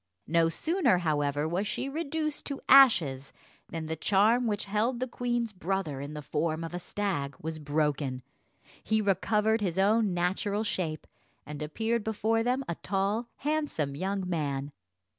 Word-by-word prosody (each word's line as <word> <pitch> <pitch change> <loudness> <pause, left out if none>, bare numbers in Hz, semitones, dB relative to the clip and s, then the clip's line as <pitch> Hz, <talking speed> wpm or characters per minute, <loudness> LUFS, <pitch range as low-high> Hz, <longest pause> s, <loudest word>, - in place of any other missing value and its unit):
No 165 +1 +3
sooner, 315 - +2
however, 145 -3 0
was 180 +5 -1
she 225 +5 -2
reduced 305 +1 -3
to 280 -2 -4
ashes 160 - +6 0.4
than 165 -1 -4
the 160 +1 -3
charm 215 +8 +3
which 205 -2 -1
held 215 +5 0
the 255 - 0
queen's 240 -2 -2
brother 180 -6 -2
in 145 +2 -6
the 150 - -6
form 160 +2 -1
of 165 - -6
a 175 - -3
stag 170 -8 -3
was 160 0 -5
broken; 145 -3 -1 0.6
he 220 0 +1
recovered 210 +2 +2
his 185 -3 -1
own 210 +1 +3
natural 195 +4 0
shape, 165 -7 -3 0.4
and 150 +1 -7
appeared 225 +9 -1
before 220 +1 +1
them 250 +3 0
a - - -1
tall, 205 +4 0
handsome 290 - -1
young 190 +3 -2
man. 145 -5 -2
195 Hz, 155 wpm, -29 LUFS, 155-225 Hz, 0.6 s, ashes